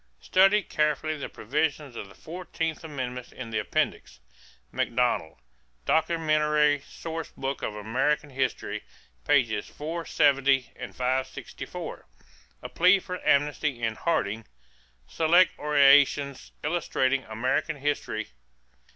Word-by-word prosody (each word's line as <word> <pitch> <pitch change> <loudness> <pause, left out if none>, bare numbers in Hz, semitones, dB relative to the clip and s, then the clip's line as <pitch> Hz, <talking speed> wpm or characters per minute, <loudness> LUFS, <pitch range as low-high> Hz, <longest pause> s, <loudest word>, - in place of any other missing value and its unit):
= - - -43
Study 195 +2 +4
carefully 150 +1 0
the 145 - -6
provisions 145 +1 -2
of 100 - -6
the - - -16
fourteenth 165 -2 -5
amendment 125 -5 -5
in 115 -3 -8
the 110 - 0
Appendix. 60 - -2 0.5
Macdonald, 120 - 0 0.5
Documentary 155 -2 +2
Source 165 -1 -6
Book 135 0 -4
of 105 - -3
American 130 +8 0
History, 130 -1 -2 0.5
pp. 120 -8 +3
470 140 -4 +1
and - - -8
564. 130 +1 -4 0.6
A - - -6
plea 180 +3 +5
for 180 -1 -6
amnesty 145 -2 +1
in 110 -1 +1
Harding, 110 -6 -1 0.6
Select 170 - +4
Orations 140 -1 +4
Illustrating 135 -4 0
American 115 +7 -1
History, 145 +1 -2
pp. - - -24
145 Hz, 110 wpm, -27 LUFS, 125-155 Hz, 0.6 s, plea